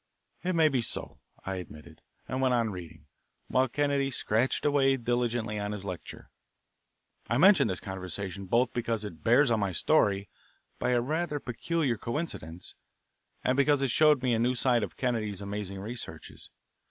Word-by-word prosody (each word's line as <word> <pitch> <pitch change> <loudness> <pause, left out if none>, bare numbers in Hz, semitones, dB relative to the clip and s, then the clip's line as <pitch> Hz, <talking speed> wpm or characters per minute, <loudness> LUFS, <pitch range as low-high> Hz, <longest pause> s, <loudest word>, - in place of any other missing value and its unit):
"It 185 0 0
may 160 -1 +5
be 135 -5 +1
so;" - - -5 0.3
I 95 0 -3
admitted, 80 -2 -10 0.3
and 130 0 -2
went 130 -1 +3
on 115 -2 +1
reading, 85 -4 -9 0.4
while 130 +1 +3
Kennedy 140 +1 0
scratched 120 -1 0
away 135 -2 +3
diligently 120 -3 -1
on 105 0 -3
his 100 -2 -6
lecture. 90 -3 -8 1.0
I 120 - +2
mention 190 +6 +6
this 95 - -2
conversation 95 0 -5
both 120 +5 +2
because 115 -2 -2
it 85 -6 -9
bears 120 +3 +5
on 110 - +2
my 100 -2 -1
story, 100 - +2 0.5
by - - 0
a 120 - +3
rather 150 +3 -1
peculiar 135 -1 -1
coincidence, 115 - -5 0.7
and 130 - +2
because 140 0 +3
it 135 - +1
showed 150 -3 +4
me 125 -2 +2
a 115 - +1
new 125 +2 +2
side 125 -1 +2
of - - -5
Kennedy's 110 -6 -1
amazing 100 -1 -5
researches. 115 +5 -8
120 Hz, 165 wpm, -29 LUFS, 100-135 Hz, 1.0 s, mention